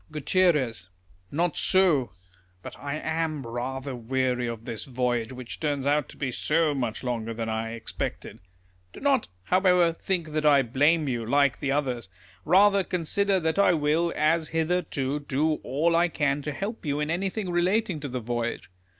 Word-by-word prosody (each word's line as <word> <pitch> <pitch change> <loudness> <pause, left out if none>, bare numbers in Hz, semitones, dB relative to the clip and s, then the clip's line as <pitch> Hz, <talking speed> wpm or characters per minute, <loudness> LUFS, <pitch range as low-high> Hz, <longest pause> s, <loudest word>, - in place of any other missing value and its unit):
Gut. 150 - +1 0.4
Not 165 +2 0
so. 170 - +3 0.5
But - - -8
I 140 +1 -4
am 160 -2 -2
rather 130 +3 -4
weary 125 +1 -1
of 115 -1 -6
this 110 -2 -5
voyage, 120 -3 -1
wliich 125 -2 -8
turns 145 -3 -1
out 145 0 +1
to - - -13
be 140 -3 -2
so 155 +4 +1
much 125 -5 -3
longer 115 -2 -3
than 115 0 -3
I 110 +1 -2
expected. 115 - -5 0.5
Do - - -10
not, 275 -4 +2 0.2
liowever, 180 -2 +4
think 170 -3 -2
that 155 0 -2
I 145 -2 +5
blame 145 +6 +2
you, 120 -3 -1
like 140 +2 +2
the 140 - -1
others. 125 -7 -1 0.4
Kather, 195 +3 +5
consider 190 +3 +1
that 160 +3 0
I 200 - +5
will, 160 +2 +1
as 155 +1 +2
hitherto, 160 -4 -1
do 150 +2 0
all 160 +5 +1
I 170 +1 +4
can 145 -2 0
to 150 - -4
help 200 - -5
you 145 -2 -1
in 150 +1 -1
anything 190 +2 -2
relating 185 +1 +1
to 145 - -5
the 125 0 -3
voyage. 120 -4 -3
150 Hz, 165 wpm, -26 LUFS, 125-170 Hz, 0.5 s, I